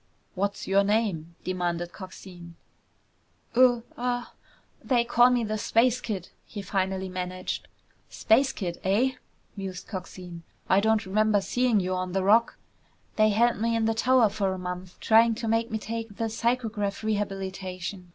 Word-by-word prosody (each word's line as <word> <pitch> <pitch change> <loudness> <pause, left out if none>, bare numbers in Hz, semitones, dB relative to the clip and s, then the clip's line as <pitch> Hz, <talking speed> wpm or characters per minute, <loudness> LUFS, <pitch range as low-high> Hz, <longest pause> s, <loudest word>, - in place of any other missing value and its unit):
"What's 200 +2 -2
your 195 +1 +4
name?" 200 -6 0
demanded 175 -1 -2
Coxine. 180 -3 -11 1.0
"Uh 245 -1 +5
uh 245 0 -2 0.6
they 245 -3 +2
call 240 +1 +5
me 245 -1 +2
the 215 0 -2
Space 245 +3 +2
Kid!" 195 -7 -4
he 205 -2 -8
finally 190 0 -1
managed. 185 0 -4 0.4
"Space 260 +5 +3
Kid, 175 -8 -5
eh?" 215 +8 +2 0.4
mused 190 -3 -6
Coxine. 180 -3 -8 0.3
"I 190 - +4
don't 220 +1 +2
remember 210 +2 +2
seeing 245 +2 +1
you 185 0 -1
on 185 -1 -3
the 190 -1 0
Rock." 225 +4 +4 0.6
"They 215 0 +4
held 235 +3 +3
me 230 0 +1
in 225 -1 +1
the 225 - +2
tower 245 0 +4
for 195 -1 -1
a - - -6
month 180 0 -6
trying 225 +1 +5
to 230 - -4
make 225 +1 +1
me 220 - -2
take 225 -1 -5
the 225 -1 -1
psychograph 225 -3 -1
rehabilitation. 190 -3 -4
205 Hz, 150 wpm, -27 LUFS, 185-230 Hz, 1.0 s, Uh